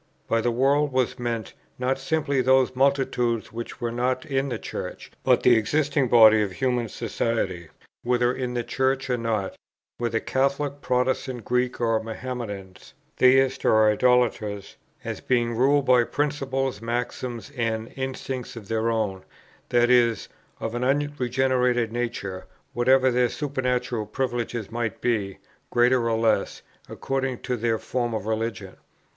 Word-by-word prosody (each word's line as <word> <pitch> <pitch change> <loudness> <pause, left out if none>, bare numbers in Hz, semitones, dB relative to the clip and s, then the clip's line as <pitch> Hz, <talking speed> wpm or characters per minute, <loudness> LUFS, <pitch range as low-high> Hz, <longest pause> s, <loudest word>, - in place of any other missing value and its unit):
By 115 - +1
the 120 - +1
world 140 +4 +2
was 130 -2 0
meant, 115 -2 -3 0.2
not 130 +1 -1
simply 140 -1 0
those 130 0 +3
multitudes 125 -4 +1
which 115 +1 -7
were 120 -1 -2
not 125 +2 -1
in 135 -1 -1
the 120 - -2
Church, - - -7
but - - +3
the 125 - +6
existing 140 +4 +1
body 110 -2 +7
of 100 -3 -2
human 125 -1 -1
society, 105 -7 -2 0.3
whether 120 0 +1
in 125 -1 -4
the 120 - -1
Church 130 +1 0
or 125 - +1
not, 110 -4 -2 0.4
whether 115 -1 0
Catholics, 140 +2 -1
Protestants, 125 -1 -1
Greeks, 125 0 0
or 115 -2 +1
Mahometans, 110 -5 -7 0.2
theists 135 +1 +4
or 110 -1 +5
idolaters, 110 -4 +1 0.3
as - - -5
being 120 -2 +1
ruled 135 +3 +3
by 125 -2 +5
principles, 135 -5 -2
maxims, 120 +2 -4
and 115 -2 -2
instincts 130 -1 -5
of 105 -4 -10
their 115 0 0
own, 105 -5 -1 0.5
that 120 0 +3
is, 120 -2 +3 0.3
of 115 - -4
an 120 +1 -2
unregenerate 130 -3 +1
nature, 115 -6 -4 0.3
whatever 130 +2 +4
their 125 0 +2
supernatural 125 -6 -2
privileges 120 -2 -3
might 115 -3 -3
be, 105 -5 -1 0.3
greater 120 0 +3
or 115 - +1
less, 115 0 0 0.3
according 135 -1 -2
to 125 - -2
their 115 -1 0
form 120 0 -2
of 105 -2 -4
religion. 110 -1 -3
120 Hz, 140 wpm, -25 LUFS, 115-130 Hz, 0.5 s, body